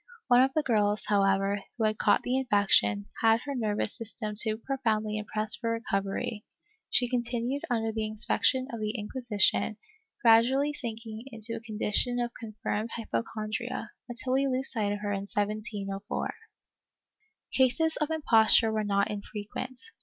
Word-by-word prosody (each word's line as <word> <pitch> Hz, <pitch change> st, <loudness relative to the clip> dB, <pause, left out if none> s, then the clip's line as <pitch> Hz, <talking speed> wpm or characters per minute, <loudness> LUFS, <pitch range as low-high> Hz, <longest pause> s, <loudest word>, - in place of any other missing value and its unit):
One 245 Hz, 0 st, +7 dB
of 265 Hz, +1 st, +3 dB
the 310 Hz, -, +2 dB
girls, 210 Hz, -4 st, +1 dB
however, 195 Hz, 0 st, +2 dB, 0.2 s
who 225 Hz, -, -1 dB
had 215 Hz, 0 st, +1 dB
caught -, -, +3 dB
the 250 Hz, -, -1 dB
infection, 200 Hz, -, +3 dB, 0.2 s
had 225 Hz, 0 st, +4 dB
her 280 Hz, -, -5 dB
nervous 215 Hz, -4 st, -1 dB
system 220 Hz, -1 st, -4 dB
too 215 Hz, 0 st, +3 dB
pro 270 Hz, +4 st, -4 dB
foundly 215 Hz, -1 st, 0 dB
impressed 215 Hz, 0 st, -2 dB
for 230 Hz, -1 st, -2 dB
recovery; 210 Hz, -1 st, -2 dB, 0.5 s
she 245 Hz, -, +3 dB
continued 240 Hz, +2 st, -2 dB
under 225 Hz, -2 st, 0 dB
the 220 Hz, -1 st, -2 dB
inspec 215 Hz, 0 st, -2 dB
tion 260 Hz, -1 st, +3 dB
of 230 Hz, -, -4 dB
the 215 Hz, +2 st, -2 dB
Inquisition, 215 Hz, -2 st, +1 dB, 0.4 s
gradually 260 Hz, +5 st, +4 dB
sinking 225 Hz, -4 st, -6 dB
into 230 Hz, -3 st, -2 dB
a 230 Hz, -, -4 dB
condition 225 Hz, +2 st, -1 dB
of 240 Hz, 0 st, -1 dB
confirmed 215 Hz, 0 st, -4 dB
hypochondria, 215 Hz, -, -4 dB, 0.2 s
until 245 Hz, +2 st, +1 dB
we 275 Hz, +1 st, +2 dB
lose 260 Hz, 0 st, +3 dB
sight 210 Hz, -4 st, 0 dB
of 205 Hz, 0 st, -3 dB
her 205 Hz, -1 st, -2 dB
in 200 Hz, 0 st, -3 dB
1704.^ 205 Hz, -1 st, -3 dB, 1.2 s
Cases 315 Hz, +5 st, +3 dB
of 300 Hz, -1 st, -1 dB
imposture 225 Hz, -7 st, +5 dB
were 215 Hz, -1 st, -1 dB
not 200 Hz, 0 st, +1 dB
infrequent. 210 Hz, +5 st, -6 dB
220 Hz, 155 wpm, -28 LUFS, 210-245 Hz, 1.2 s, One